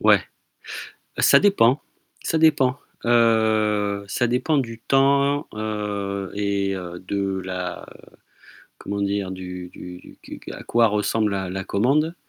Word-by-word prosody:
Ouais, - - +6 1.0
ça - - +6
dépend, 145 - +4 0.4
ça 165 - 0
dépend 145 -4 +3 0.3
heu, 110 -3 +2
Ça 120 +5 0
dépend 125 +6 +1
du 115 -4 -3
temps, 140 +3 +2
heu 105 -2 -3
et 100 -1 0
heu, 90 -1 -7
de 95 -1 -2
la, 90 -1 -5
heu, - - -17 0.7
comment 100 0 -4
dire? 100 -1 -1
Du 90 -1 -7
du 90 0 -10
du - - -15
du - - -10
à - - -9
quoi 115 -1 +3
ressemble 105 0 0
la 95 -2 -2
la 95 +1 -4
commande. 140 - +1
105 Hz, 135 wpm, -23 LUFS, 100-125 Hz, 1.0 s, Ouais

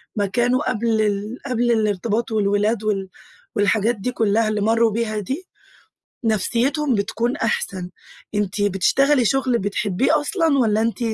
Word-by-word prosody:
ما 205 -2 +1
كانوا 245 +7 +1
قبل 225 -1 0
ال 210 +3 -1
قبل 240 -2 +1
الارتباط 220 +1 0
والولاد 210 +1 +1
وال 195 -3 -1 0.5
والحاجات 215 +3 +2
دي 215 +5 -3
كلها 220 -1 +1
اللي 210 -1 -1
مروا 225 +1 +3
بيها 215 -1 -2
دي، 270 - -4 0.8
نفسيتهم 240 +5 +1
بتكون 235 +5 -1
أحسن. 190 - -2 0.5
أنتِ 205 0 -1
بتشتغلي 245 +8 +2
شغل 255 0 +1
بتحبيه 205 - +1
أصلًا، 320 -2 +1
والّا 220 -2 +2
أنتِ 230 +2 -1
225 Hz, 135 wpm, -21 LUFS, 205-245 Hz, 0.8 s, مروا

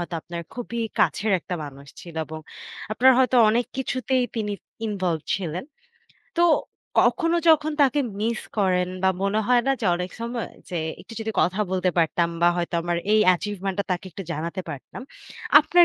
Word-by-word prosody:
হয়তো 175 0 -4
আপনার 170 0 -6
খুবই 235 -1 -4 0.2
কাছের 215 -1 +2
একটা 180 - -5
মানুষ 140 -1 -10
ছিল 170 -2 -11
এবং 155 0 -7 0.5
আপনার 260 +4 +6
হয়তো 255 -1 +3
অনেক 235 +2 +2
কিছুতেই 255 -1 0
তিনি 210 -2 -1 0.3
involved 185 -7 -2
ছিলেন। 180 -2 -4 0.7
তো - - +5 0.6
কখনো 335 -1 +2
যখন 310 -1 +5
তাকে 275 +1 +3 0.2
miss 225 0 0 0.2
করেন 180 -2 +2
বা 190 - +5
মনে 200 +2 +1
হয় 245 -1 +4
না 270 - +4
যে - - 0
অনেক 180 +1 -4
সময়, 235 0 -3 0.2
যে 175 - -3 0.2
"একটু - - -13
যদি 220 - -2
কথা 190 +4 +1
বলতে 185 -1 +1
পারতাম 170 +1 +2
বা 175 - +7
হয়তো 175 0 -2
আমার 175 0 -1 0.2
এই 215 - +5
achievement 195 0 -3
টা 200 - +1
তাকে 180 +1 -1
একটু 195 +4 -7
জানাতে 170 +4 -3
পারতাম?" 145 - -8 0.6
আপনার 345 +3 +5
200 Hz, 170 wpm, -24 LUFS, 175-245 Hz, 0.7 s, বা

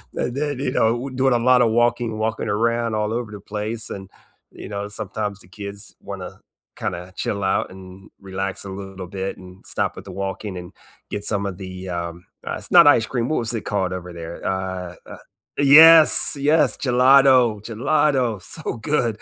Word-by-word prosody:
And 120 - -2
then, 145 -2 -2
you 135 -2 -1
know, 120 +3 0
doing 130 0 +1
a 120 - +2
lot 125 -1 +5
of 115 -2 +3
walking 120 -1 +1
walking 110 +1 -2
around 115 +2 0
all 105 0 -1
over 115 -2 -4
the 105 - -8
place, 105 +2 -5
and, 95 -1 -8 0.4
you - - -10
know, 100 -1 -4
sometimes 105 0 -5
the 90 - -14
kids 100 +2 -9
wanna - - -8 0.4
kinda 90 +2 -5
chill 100 -1 -3
out 95 -1 0
and 95 +1 -13
relax 95 0 -5
a - - -7
little 95 -1 -8
bit 95 +1 -5
and 90 0 -14
stop - - -2
with - - -10
the 100 - -9
walking 95 +1 -5
and 90 0 -9 0.4
get 105 -1 -4
some 100 -2 -1
of 95 -3 -5
the, 95 -1 -8
um, 85 0 -5 0.2
uh, - - -2
it's - - -6
not - - +8
ice 120 -6 +5
cream, 120 -2 -2
what 155 - 0
was 115 0 +1
it 115 - -3
called 95 -3 -1
over 90 -1 -7
there? 85 0 -7
Uh, 95 -2 -3 0.6
yes, 155 +3 +8
yes! 150 +3 +2
Gelato, 130 -3 +4
gelato, 125 -2 0
so 160 - -5
good! 115 -2 -1
105 Hz, 185 wpm, -21 LUFS, 95-120 Hz, 0.6 s, not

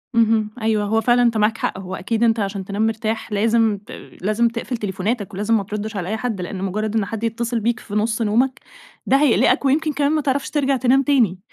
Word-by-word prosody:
اهم، 225 -2 +3
أيوه، 220 -1 +1
هو 225 +2 +1
فعلًا 240 +2 +3
أنتَ 235 -2 +2
معاك 215 +1 +2
حق، 190 - -2
هو 185 0 -6
أكيد 225 +5 -1
أنتَ 230 -1 +3
عشان 195 -1 -3
تنام 205 +3 0
مرتاح، 220 0 -3
لازِم 220 0 +2
ت 200 - -15 0.3
لازِم 215 +5 +2
تقفل 235 +2 -4
تليفوناتَك 205 +1 -3
ولازِم 210 +4 +1
ما 205 - -2
تردش 210 +2 -5
على 180 -2 -3
أي 220 - -1
حد، 220 -6 -3
لإن 185 +1 -5
مُجرَّد 215 +3 -2
إن 215 -3 +1
حد 225 +3 -6
يتّصل 230 +1 -1
بيك 235 +2 0
في 205 - -8
نُص 220 +2 0
نومَك 245 +5 +1 0.5
ده 270 - +4
هيقلقَك 280 -1 +3
ويمكن 300 +3 +2
كمان 285 +1 +1
ما 310 - +1
تعرفش 275 0 -1
ترجَع 280 -2 +1
تنام 260 +2 +3
تاني. 240 -10 +2
225 Hz, 220 wpm, -21 LUFS, 210-240 Hz, 0.5 s, ده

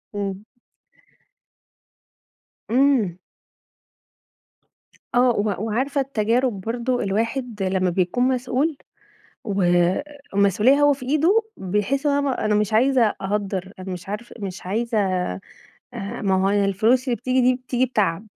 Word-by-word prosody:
امم. 200 0 -4 2.3
إمم. 245 -9 +2 2.0
آه، 250 0 +5
و 205 -2 0
وعارفة 275 +6 0
التجارب 235 -3 0
برضو، 240 +4 -2
الواحد 225 +1 -2
لمّا 185 -1 +1
بيكون 185 +7 0
مسؤول 260 +4 0 0.7
والمسؤوليّة 200 - +2
هو 290 0 +5
في 260 -2 -8
إيده، 320 - +3 0.2
بيحس 210 +10 -1
إن 290 - +3
هو 280 - +2
أنا 280 -1 0
م 255 - -2
أنا 210 - +2
مش 210 +1 0
عايزة 255 +3 +4
أ - - -6
أهدّر، 195 -1 -3
أنا 185 0 -5
مش 180 +2 -9
عارف 220 +4 -6
مش 190 -3 -6
عايزة 225 +4 -1
آآ، 185 - 0 0.8
ما 190 -1 +2
هو - - +3
أنا 205 0 +2
الفلوس 220 +7 +2
اللي 245 -3 -1
بتيجي 255 +1 0
دي، 255 0 +4
بتيجي 250 0 -1
بتعب، 210 -4 -1
220 Hz, 130 wpm, -22 LUFS, 195-255 Hz, 2.3 s, آه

